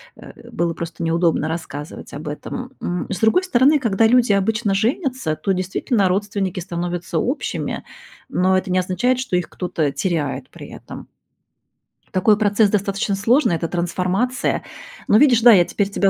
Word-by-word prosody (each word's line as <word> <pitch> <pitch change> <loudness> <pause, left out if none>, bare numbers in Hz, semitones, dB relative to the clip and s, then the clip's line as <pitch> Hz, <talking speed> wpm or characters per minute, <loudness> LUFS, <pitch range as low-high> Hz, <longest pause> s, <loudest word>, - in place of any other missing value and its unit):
э, - - -14
было 170 0 -1
просто 170 0 -7
неудобно 165 -1 +1
рассказывать 155 -2 -7
об 150 +2 -7
этом. 245 - -6
М, 175 0 -3
с 185 - -3
другой 220 - +3
стороны, 290 -3 +4
когда 225 -4 +2
люди 240 -2 +4
обычно 205 +1 +1
женятся, 250 - -1
то 155 +6 -2
действительно 190 +3 0
родственники 195 -1 -1
становятся 175 -1 -4
общими, 260 - -2 0.5
но 185 +1 +2
это 185 0 -3
не 185 - +2
означает, 240 +8 0
что 255 -8 -2
их 180 -1 -1
кто-то 165 -5 -2
теряет 160 -3 -2
при - - -11
этом. - - -10 1.0
Такой 205 +3 +3
процесс 205 0 +3
достаточно 200 0 -1
сложный, 225 - +2
это 165 0 -2
трансформация. 180 +8 -1 0.5
Но 210 - +6
видишь, 245 -3 +5
да, 240 +1 +8
я 180 -5 +6
теперь 200 +2 -1
тебя 200 -1 +2
195 Hz, 155 wpm, -20 LUFS, 175-225 Hz, 1.0 s, да